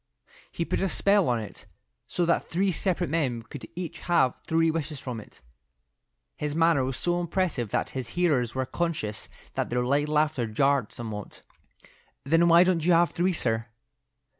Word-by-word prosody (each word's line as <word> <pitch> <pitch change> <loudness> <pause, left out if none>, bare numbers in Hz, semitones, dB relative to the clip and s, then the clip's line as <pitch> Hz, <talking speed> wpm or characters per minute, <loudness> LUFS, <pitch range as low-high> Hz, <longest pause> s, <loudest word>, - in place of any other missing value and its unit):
He 170 - -2
put - - -1
a 195 - +1
spell 200 -4 +3
on 120 -2 +1
it 105 - -9 0.4
so 175 - 0
that 170 - +1
three 190 +3 +1
separate 180 0 -1
men 130 -8 0
could 135 +3 -9
each 175 -2 -5
have 150 -8 +2
three 165 0 +3
wishes 155 -3 -3
from 125 -4 -5
it." - - -17 0.9
His 150 0 -3
manner 165 -4 +3
was 130 0 -2
so 175 0 0
impressive 170 - -1
that - - -1
his 130 -3 -4
hearers 140 -10 +2
were 130 0 0
conscious 150 -9 -2 0.2
that - - -2
their 125 0 0
light 145 +3 +1
laughter 150 -5 +1
jarred 135 +1 +1
somewhat. 110 -3 -6 0.8
"Well, 165 +3 +4
why 170 +1 +7
don't 180 -3 +1
you 175 +2 +4
have 170 +1 +4
three, 180 +1 +1
sir?" 115 -7 -1
155 Hz, 170 wpm, -27 LUFS, 125-170 Hz, 0.9 s, why